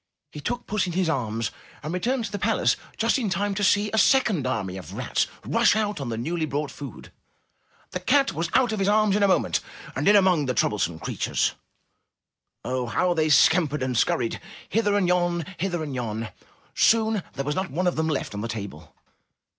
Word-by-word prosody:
He 150 - -8
took 245 +10 -3
puss 205 -3 -1
in 175 - -4
his 180 -1 +1
arms 115 -6 -1 0.3
and 155 +3 -4
returned 235 +6 -1
to 200 - -6
the 205 - -4
palace 220 +3 +2 0.2
just 230 +4 +2
in 225 -5 -1
time 200 +2 -1
to 205 +1 -2
see 205 +1 +3
a 220 - +3
second 210 - +3
army 100 -7 -2
of 95 - -9
rats - - 0 0.2
rush - - +3
out 210 -7 -1
on 130 - -4
the 115 - -3
newly 160 +6 -2
brought 145 +1 -3
food. 140 -7 -10 0.8
The 180 - -3
cat 275 +9 +2
was 165 +1 -2
out 250 -3 +4
of 215 - -2
his 195 - +1
arms 210 -1 +3
in 210 - +1
a 200 - +5
moment 190 - +2 0.4
and - - -1
in 205 - +7
among 185 -8 +4
the 125 - -1
troublesome 95 -7 0
creatures. 80 - -1 1.1
Oh! 125 0 -2
how 180 +9 +1
they 155 -2 +1
scampered 150 0 +4
and 130 -1 -1
scurried! 115 0 +1 0.3
Hither 205 -2 +1
and 190 -3 +2
yon! 175 -2 +1
Hither 175 -2 -1
and 145 -3 -5
yon! 115 -3 -3 0.4
Soon 220 -2 +3
there 140 - -4
was 145 - 0
not 190 +4 -2
one 170 +7 -2
of 180 - +1
them 160 0 0
left 140 -7 -2
on 100 - -4
the 115 - -3
table. 100 -9 -7
175 Hz, 205 wpm, -25 LUFS, 130-205 Hz, 1.1 s, in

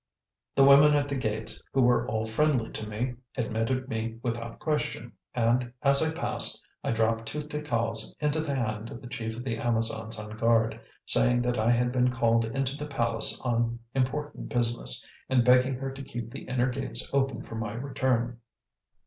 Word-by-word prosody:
The 135 - +6
women 140 +2 +7
at 145 -1 +1
the 140 - -3
gates, 110 -4 -2
who 135 - +3
were 120 0 +3
all 110 0 -1
friendly 120 0 +1
to 110 - -5
me, 120 +4 -3 0.2
admitted 120 +2 -1
me 115 -2 -3
without 115 -1 -4
question, 150 -6 -2 0.2
and, 120 +1 +1
as 140 -1 +6
I 160 0 +2
passed, 160 - +3 0.2
I - - -2
dropped 115 0 0
two 150 - -3
ticals 115 -7 -1
into 150 +1 +1
the 150 -3 -2
hand 110 -3 -2
of - - -8
the 125 - -10
chief 110 -2 -4
of 120 - -6
the 115 -4 -2
Amazons 115 -1 0
on 105 0 -7
guard, 115 0 +2 0.2
saying 120 0 +3
that 125 -1 0
I 110 +2 +2
had 120 +1 +2
been 125 0 +2
called 115 -2 +2
into 135 +3 -2
the 150 +1 -6
palace 115 -5 +1
on 120 -1 0 0.2
important 145 +3 -2
business, 120 -1 +1 0.2
and 125 -2 +3
begging 125 +1 +5
her 135 +1 -4
to 135 +1 -8
keep 120 -4 -6
the - - -8
inner 125 0 0
gates 135 +1 -1
open 135 -4 0
for - - -11
my 110 -2 -4
return. 120 -2 -1
120 Hz, 185 wpm, -28 LUFS, 115-135 Hz, 0.2 s, women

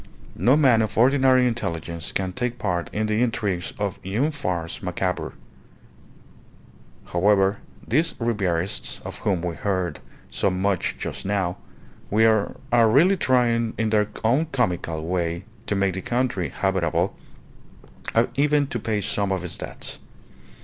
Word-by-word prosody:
No 130 +5 +5
man 130 -7 +5
of 110 -1 -2
ordinary 130 +1 +5
intelligence 85 -8 -3
can 95 -1 -2
take 125 +4 -2
part 90 -6 -2
in 110 +1 -1
the 110 +1 +1
intrigues 105 -7 -1
of 100 -3 -2
une 110 - 0
farce 90 - -3
macabre. 90 0 -2 1.8
However, 95 +2 +3 0.3
these 160 +7 +1
Ribierists, 100 -6 -1
of - - -6
whom 95 -4 0
we 85 -2 -3
hear 95 -3 -1 0.4
so 100 - +1
much 95 0 0
just - - -5
now, 95 -3 -1 0.6
are 110 +1 +3
really 165 - +5
trying 120 -7 +2
in 110 -1 0
their 105 -1 +3 0.2
own 130 +9 +3
comical 90 -10 -1
way 85 -1 -1 0.2
to 105 - 0
make 100 -1 +1
the 95 - -4
country 120 -7 -1
habitable, 95 -4 0 1.0
and - - +4
even 145 +1 +3
to 125 -3 -4
pay 105 -1 -1
some 100 0 -1
of 95 -2 -1
its 90 - -5
debts. - - -6
105 Hz, 135 wpm, -24 LUFS, 90-120 Hz, 1.8 s, No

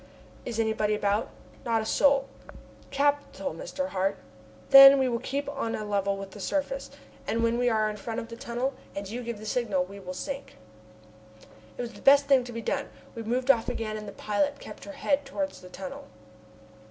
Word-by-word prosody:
"Is 230 -2 -4
anybody 220 -1 +1
about?" 205 +1 0 0.3
"Not 230 -3 +1
a - - -7
soul." 275 +3 +3 0.6
"Capital, 285 +1 0
Mr. 285 - -4
Hart. 195 -2 0 0.5
Then 275 0 +11
we 265 -1 +2
will 235 -2 -1
keep 280 +4 -3
on 275 -5 -2
a 215 - -4
level 200 -1 0
with 195 -1 -7
the 210 - -11
surface, 295 - -2 0.4
and 230 +1 0
when 230 +1 +2
we 245 0 +3
are 215 -2 +2
in 210 0 -4
front 225 +3 -4
of 230 - -6
the 230 - -8
tunnel, 245 +4 -3 0.2
and 200 0 -4
you 235 +5 -5
give 235 -2 -5
the 215 - -10
signal, 210 -5 0
we 200 +2 -11
will 185 -1 -7
sink." 275 +8 -6 1.2
It - - -3
was 240 - -6
the - - -13
best 280 +1 +6
thing 275 -3 +4
to 245 - -7
be 230 -1 -6
done. - - -2 0.2
We 230 - -6
moved 250 +4 +3
off 230 -4 0
again 215 -1 -3
and 210 -1 -6
the - - -6
pilot 285 +7 -1
kept - - -10
her 300 - -8
head 285 0 0
towards 285 +1 -4
the 180 - -12
tunnel. 185 0 -8
235 Hz, 200 wpm, -28 LUFS, 210-275 Hz, 1.2 s, Then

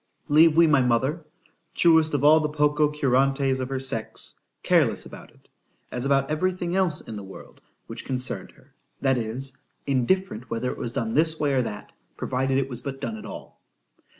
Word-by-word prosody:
—— - - -41
Leave 160 0 +6
we 170 - +7
my 150 -4 +4
mother—(truest 155 +4 0
of 140 - -1
all 155 +2 +7
the 155 -1 -1
Poco 150 0 +2
curante's 135 -1 +1
of 130 0 -3
her 135 -1 -2
sex!)—careless 130 -4 -1
about - - -11
it, - - -26 0.4
as 125 +2 -2
about 135 0 +2
every 185 +5 +1
thing 175 -1 -3
else 180 -5 +2
in 110 - -8
the 100 - -7
world 95 0 -13 0.2
which - - -7
concerned 130 -1 -3
her;—that 135 -2 -4
is,—indifferent 130 - -2
whether 120 +2 -2
it - - -8
was 115 - -3
done 115 -1 -2
this 160 +1 +2
way 145 -2 +1
or 130 - +3
that,——provided 130 +4 -3
it 135 -1 0
was 125 -2 -6
but 135 -1 -6
done 225 - -4
at 220 - -9
all. - - -10
135 Hz, 175 wpm, -25 LUFS, 130-155 Hz, 0.4 s, we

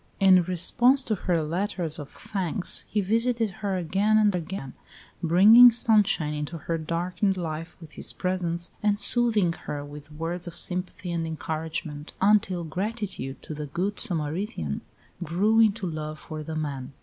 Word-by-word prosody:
In 190 -2 +6
response 240 +10 +3
to 225 - -1
her 175 -4 0
letters 170 0 -2
of 145 -1 -8
thanks, 190 -2 -1
he 210 - 0
visited 230 +2 +1
her 195 -2 -1
again 195 +5 +2
and 210 -3 +3
again, 165 -6 -5 0.5
bringing 205 +9 +8
sunshine 210 -9 +2
into 150 +3 -4
her 165 +1 -3
darkened 180 +5 -1
life 165 -1 -5
with 160 -3 -13
his - - -4
presence, 175 -2 -2
and 205 -1 +1
soothing 215 -5 +3
her 145 -3 -6
with 145 +1 -11
words 165 +3 -5
of 170 - -8
sympathy 180 0 -4
and 165 -1 -2
encouragement, 155 -1 -5
until 195 -3 +2
gratitude 185 - -4
to - - -7
the 150 0 -6
"good 185 +8 -2
Samaritan" 155 - -3 0.4
grew 200 +7 +2
into 220 -2 +3
love 155 -2 -5
for 155 0 -8
the 155 +1 -6
man. 140 -3 -4
175 Hz, 150 wpm, -26 LUFS, 155-205 Hz, 0.5 s, bringing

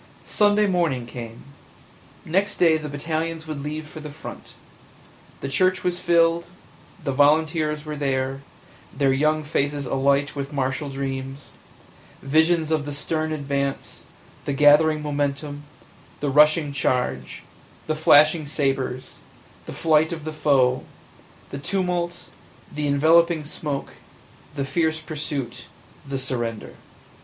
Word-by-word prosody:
Sunday 210 0 +3
morning 170 -10 0
came 115 -1 -9 0.4
– - - -27
next 195 +5 0
day 165 -3 +5
the 155 -1 -4
battalions 160 +2 -3
would 155 -3 -5
leave 155 +2 -5
for 155 - -10
the 150 0 -7
front; 150 +2 -10 0.9
the - - -3
church 185 +7 +1
was 180 0 -1
filled; 170 -1 +3 0.6
the 140 - -1
volunteers 150 +2 +2
were 150 0 -4
there, 135 -1 -1 0.5
their 135 -2 +2
young 155 +3 +1
faces 145 -1 -1
alight 140 +2 +1
with 140 0 -4
martial 135 +1 -2
dreams 135 0 -5 0.4
– - - -25
visions 160 +3 +2
of 155 -2 +1
the - - -3
stern 155 +2 -2
advance, 140 -2 -3 0.4
the 140 - -1
gathering 150 +2 +5
momentum, 145 0 -3 0.5
the 145 -1 -1
rushing 150 +1 +4
charge, 125 - -1 0.4
the 155 - 0
flashing 155 0 +5
sabers, 135 -3 -2 0.5
the - - -5
flight 160 0 +2
of 165 -3 -5
the 155 - -4
foe, 130 -4 +2 0.7
the 140 - -5
tumult, 175 +1 -2 0.5
the 150 0 -2
enveloping 160 +3 +4
smoke, 145 -1 -5 0.6
the 140 -2 -2
fierce 160 +2 0
pursuit, 145 -6 -5 0.4
the 135 - -2
surrender! 120 -4 -4
150 Hz, 130 wpm, -23 LUFS, 140-160 Hz, 0.9 s, day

